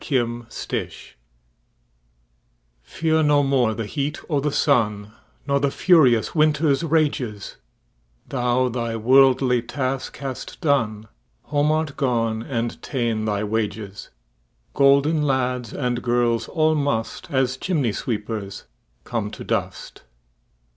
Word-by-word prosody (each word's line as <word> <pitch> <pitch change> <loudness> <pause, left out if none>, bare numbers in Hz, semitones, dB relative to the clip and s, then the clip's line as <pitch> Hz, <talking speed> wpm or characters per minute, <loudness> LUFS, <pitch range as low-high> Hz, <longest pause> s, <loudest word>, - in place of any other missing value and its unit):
Fidele 120 -3 -3 1.7
FEAR 160 - 0
no 145 -1 +4
more 130 -5 +2
the 115 0 -3
heat 145 +6 -3
o' 145 - +2
the 150 +2 0
sunNor 115 +1 -1
the 140 - +2
furious 135 -9 +4
winter's 150 -1 +2
rages; 145 -10 -1 0.7
Thou 125 -1 +1
thy 115 -1 -3
worldly 130 +1 +4
task 130 +2 -3
hast 135 -2 -6
done, 115 - 0 0.4
Home 145 +1 +1
art 155 -2 -1
gone 115 -5 0
and 120 -2 -3
ta'en 115 -5 -2
thy 105 -1 -1
wages:Golden 105 - -1
lads 125 -4 -1
and 125 -3 -2
girls 120 -1 +1
all 155 -1 +2
must, 140 -7 -2
As 130 -2 +1
chimney 140 - -1
sweepers, 105 -3 -4 0.4
come - - -3
to - - -9
dust. - - -4
125 Hz, 105 wpm, -22 LUFS, 115-145 Hz, 1.7 s, no